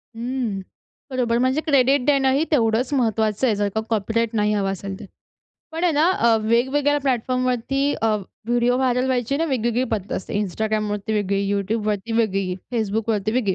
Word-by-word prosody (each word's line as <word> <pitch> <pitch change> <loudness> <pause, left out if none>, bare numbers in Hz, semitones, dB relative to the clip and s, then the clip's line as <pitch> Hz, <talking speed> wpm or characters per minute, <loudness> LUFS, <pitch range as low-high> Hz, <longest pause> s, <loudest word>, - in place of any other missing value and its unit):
हं. 235 -4 -3 0.5
बरोबर, 240 -2 +1
म्हणजे 260 +5 +1
क्रेडिट 275 -3 +3
देणं 275 -2 +3
ही 280 +4 +2
तेवढंच 245 -1 +2
महत्त्वाचं 220 -2 +1
आहे 220 - +2
जर 205 0 0
का 220 - +1
कॉपीराईट 225 +1 0
नाही 210 0 +2
हवा 200 -2 0
असेल 195 0 -6
तर. - - -9 0.7
पण 330 +2 -2
आहे 345 - +3
ना 300 +1 +3
अ, 235 -10 +3
वेगवेगळ्या 265 +6 +2
प्लॅटफॉर्मवरती 255 0 0 0.2
अ, 225 - +3 0.4
व्हिडिओ 240 +1 +2
व्हायरल 255 0 +1
व्हायची 255 +1 0
ना 325 - 0
वेगवेगळी 245 -3 0
पद्धत 205 -3 -3
असते. 190 - -6
Instagramवरती 210 +1 -2
वेगळी, 200 -1 0
YouTubeवरती 210 +2 -1
वेगळी, 195 -5 0 0.2
Facebookवरती 215 -1 -1
वेगळी. 215 -7 +1
230 Hz, 160 wpm, -22 LUFS, 210-260 Hz, 0.7 s, क्रेडिट